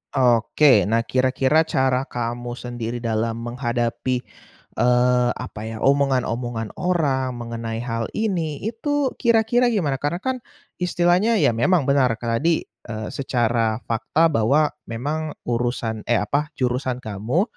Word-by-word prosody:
Oke, 120 -2 +4
nah 115 +1 +2
kira-kira 130 +5 +2
cara 130 0 +1
kamu 120 0 -4
sendiri 120 -1 -5
dalam 115 +1 -1
menghadapi, 120 +1 -2 0.6
eee, 125 0 +3
apa 125 -4 -7
ya, 110 - -5
omongan-omongan 125 -5 +1
orang 140 -8 0
mengenai 115 -1 -5
hal 115 -2 -2
ini, 175 -9 -1
itu 265 +6 -1
kira-kira 235 +1 +3
gimana? 155 - 0
Karena 170 +5 -2
kan, 260 0 -1 0.4
istilahnya 180 +5 +2
ya - - +5
memang 145 +9 +2
benar 130 -3 +2
kan 115 0 -2
tadi, 165 +3 +1 0.2
eee, 110 -1 -5
secara 120 -4 0
fakta 160 +8 +1
bahwa 145 +5 +3 0.2
memang 150 +7 -3
urusan 120 -2 -2
eh, 115 -3 +2
apa, 145 +7 -2
jurusan 125 0 -1
kamu, 110 - 0
125 Hz, 125 wpm, -22 LUFS, 115-155 Hz, 0.6 s, ya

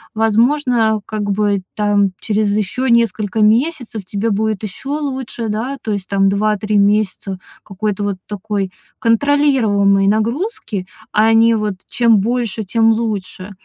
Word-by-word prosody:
Возможно, 225 0 +2
как 215 -1 -4
бы, 205 -1 +1
там, 205 -1 +2
через 210 0 0
ещё 215 +6 -2
несколько 220 -3 +1
месяцев 230 -1 +1
тебе 205 +4 -2
будет 215 0 -1
ещё 270 +8 -5
лучше, 260 -5 -4
да, 235 +6 -3
то 215 - -2
есть 195 -2 -4
там 195 -1 +2
2-3 210 +1 0
месяца 200 -2 0 0.2
какой-то 205 0 -3
вот 200 -2 -2
такой 205 -2 -3 0.3
контролируемой 230 -6 +3
нагрузки, 220 - -1 0.3
а 220 +1 +4
не 230 +1 +5
вот: 210 -2 -2
"чем 230 -3 +3
больше, 230 0 -1
тем 225 +3 +3
лучше", 205 -4 -3
215 Hz, 130 wpm, -17 LUFS, 200-230 Hz, 0.3 s, не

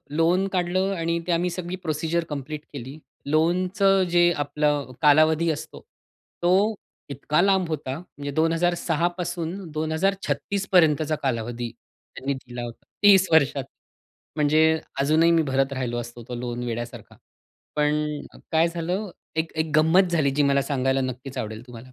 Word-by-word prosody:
Loan 175 +4 +3
काढलं 185 +2 0
आणि 170 0 -1
ते - - 0
आम्ही 175 +1 +1
सगळी 175 +1 -5
प्रोसिजर 160 +1 -1
कंप्लीट 150 +1 -5
केली. 135 +3 -8 0.3
लोनचं 185 +5 +2
जे 175 0 +4
आपलं 145 -1 0
कालावधी 155 +2 +4
असतो, 150 - -7 0.6
तो 195 +5 +3 0.3
इतका 145 +4 0
लांब 190 -2 +3
होता. 140 -4 -3
म्हणजे 145 -5 -8
2006 165 +1 +1
पासून 175 -1 -3 0.2
2036 190 +5 -1
पर्यंतचा 155 -3 +4
कालावधी 120 -1 -2 0.5
त्यांनी 140 +1 -2
दिला 125 -2 -8
होता. 120 -1 -9 0.2
30 195 -2 +7
वर्षात. 140 -3 +3 0.7
म्हणजे 155 +1 +3 0.2
अजूनही 155 +4 +4
मी 165 - +4
भरत 135 0 0
राहिलो 125 -2 -3
असतो 120 0 -8
तो 125 - -4
लोन 120 0 -4
वेड्यासारखा. 120 0 -6 0.6
पण 150 0 0 0.3
काय 160 +1 +4
झालं? 175 +4 -3 0.3
एक 160 0 -1
एक 160 -1 -1
गंमत 170 +4 +4
झाली 150 -5 +2
जी 145 - +3
मला 140 0 +3
सांगायला 135 -1 0
नक्कीच 130 +1 -5
आवडेल 110 +1 -4
तुम्हाला. 120 -2 -10
155 Hz, 140 wpm, -24 LUFS, 140-175 Hz, 0.7 s, 30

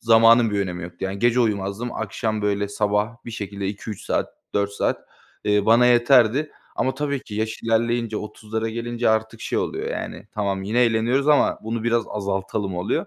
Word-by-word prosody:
zamanın 115 0 +6
bir 100 -1 0
önemi 90 -2 -3
yoktu, 85 0 -8
yani, 95 +1 -3
gece 120 +2 +3
uyumazdım 105 +1 -1
akşam, 110 0 -2
böyle, 100 0 0
sabah 105 +2 0
bir 115 - -5
şekilde 100 -2 -5
2-3 105 0 -6
saat - - -1 0.2
4 100 0 +1
saat, - - -1 0.4
eee, 105 0 +2
bana 120 +2 +6
yeterdi 125 +3 +4 0.3
ama 130 0 0
tabii 140 -1 -2
ki 105 - -9
yaş 110 +1 -3
ilerleyince 115 0 +1
30'lara 110 +1 -4
gelince 120 +1 -1
artık 110 0 0
şey - - -1
oluyor, - - -2
yani, - - -5
"Tamam 100 -2 -1
yine 110 +5 +1
eğleniyoruz 120 +5 +1
ama 150 - +4
bunu 110 0 -3
biraz 120 -1 +2
azaltalım," 100 -1 -3
oluyor. 90 - -1
110 Hz, 175 wpm, -23 LUFS, 100-120 Hz, 0.4 s, zamanın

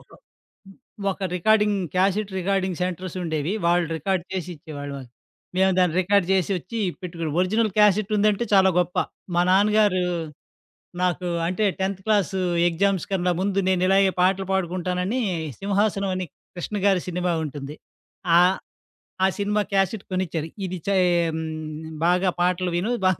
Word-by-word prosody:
ఒక - - -29 1.0
ఒక 190 0 -4
recording 210 +2 +3 0.2
cassette 195 +2 +1
recording 190 -1 -1
సెంటర్సుండేవి. 180 -3 -3
వాళ్ళు 175 0 +3
రికార్డ్ 190 -2 -1
చేసి 180 -1 -3
ఇచ్చేవాళ్ళువ 145 -3 -7 0.6
మేము 190 0 +4
దాన్ని 180 -3 +3
రికార్డ్ 200 0 +2
చేసొచ్చి 190 +3 -1 0.2
పెట్టుకోని, 165 -3 -4
ఒరిజిననల్ 215 +3 +1
క్యాసెటుందంటే 210 +1 +3
చాలా 190 -1 +6
గొప్ప. 180 0 0 0.4
మా 175 - +3
నాన్నగారు 205 -1 +4 1.0
నాకు 180 0 0 0.2
అంటే, 185 +4 0 0.2
10థ్ 190 0 -2
క్లాసు 200 -4 +1 0.3
ఎగ్జామ్స్ 190 +1 0
కన్నా 180 -1 +1
ముందు 195 0 0
నేను 185 -1 +2
ఇలాగే 195 0 +4
పాటలు 190 +1 +2
పాడుకుంటానని 185 +5 -1 0.4
'సింహాసనం' 200 -1 0
అని 185 0 -2 0.3
కృష్ణ 190 +4 -4
గారి 195 -3 +3
సినిమా 180 0 -1
ఉంటుంది. 145 -1 -6 0.6
ఆహ్, 180 +2 +5 0.7
ఆ - - +6
సినిమా 210 +1 +1
క్యాసెట్ 195 +1 +1
కొనిచ్చారు. 165 -4 -2 0.2
ఇది 185 0 -4
చె 200 - +2 0.4
హ్మ్, 160 - -3 0.6
బాగా 180 +2 +3
పాటలు 180 0 +1
విను, 200 +7 -1 0.2
బాగా 185 - +1
185 Hz, 130 wpm, -24 LUFS, 180-200 Hz, 1.0 s, చాలా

